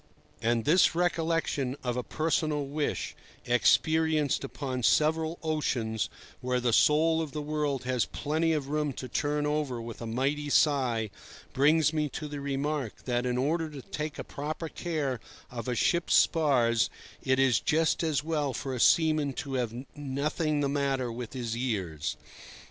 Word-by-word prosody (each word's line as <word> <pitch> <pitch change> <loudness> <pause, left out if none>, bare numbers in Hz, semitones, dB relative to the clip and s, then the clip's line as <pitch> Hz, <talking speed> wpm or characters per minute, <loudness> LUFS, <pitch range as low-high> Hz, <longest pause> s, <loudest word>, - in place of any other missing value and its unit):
And 115 0 +1
this 165 +2 +4
recollection 165 -6 0
of 125 -2 -1
a 125 - 0
personal 155 0 0
wish, 145 +2 -2 0.3
experienced 155 +4 +3
upon 130 -2 -4
several 160 +5 +2
oceans, 125 -8 -1 0.3
where 125 0 0
the 120 -1 +1
soul 160 +5 +4
of 155 -4 -5
the 150 - -3
world 150 -3 -1
has 125 -2 +1
plenty 160 +3 -1
of 145 -3 -1
room 150 -1 0
to 130 - -6
turn 145 +2 -1
over 150 -5 -1
with 115 0 -8
a 115 - -4
mighty 140 +5 -1
sigh, 125 -8 +2 0.4
brings 155 +3 +4
me 150 -1 0
to 150 - -5
the 145 -1 -6
remark 140 -2 -2
that 125 0 0
in 125 0 0
order 160 +5 0
to 140 -4 -9
take 150 -1 -5
a - - -4
proper 155 +3 -5
care 150 -7 -2 0.3
of 120 -1 -6
a 125 - 0
ship's 170 +8 +2
spars 120 - +3 0.3
it 130 0 +1
is 135 -2 +4
just 160 +1 +1
as 155 -5 0
well 150 -4 -1
for 130 +2 -4
a 125 - -3
seaman 155 +1 +4
to 135 +1 -5
have 125 0 -2
nothing 145 +2 -1
the 140 - +1
matter 135 -3 0
with 120 -1 -6
his 120 -3 -3
ears. 95 - -2
140 Hz, 160 wpm, -29 LUFS, 125-155 Hz, 0.4 s, this